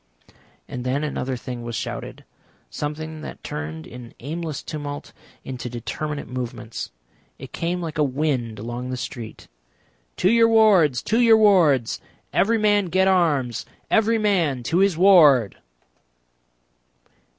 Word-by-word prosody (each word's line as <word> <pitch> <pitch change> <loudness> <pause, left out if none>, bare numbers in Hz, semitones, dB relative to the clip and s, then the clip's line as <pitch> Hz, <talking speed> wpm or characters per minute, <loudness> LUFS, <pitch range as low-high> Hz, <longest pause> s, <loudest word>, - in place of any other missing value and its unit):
And 125 - -6
then 130 +4 -1
another 135 -3 -3
thing 120 0 -7
was 120 -1 -5
shouted, - - -6 0.5
something 155 +1 -5
that - - -9
turned 80 +1 -6
an 120 -1 -11
aimless 155 +2 -5
tumult 145 -2 -6 0.3
into 125 -2 -6
determinate 145 +5 -5
movements, 120 -2 -6 0.5
it - - -10
came 175 +1 -2
like 160 -1 -5
a - - +4
wind 130 -5 -1
along 120 +3 -5
the 130 - -3
street. 120 -1 -7 0.7
"To 185 - +3
your 230 0 +5
wards, 190 - +4
to 225 +2 +1
your 230 -2 +6
wards. 170 - +3 0.3
Every 225 +3 +3
man 205 -2 +3
get 190 +2 +2
arms. 145 - +1 0.3
Every 225 +1 +3
man 175 - +1
to 165 +8 +1
his 195 -4 +3
ward!" 155 - +6
150 Hz, 130 wpm, -23 LUFS, 125-185 Hz, 0.7 s, your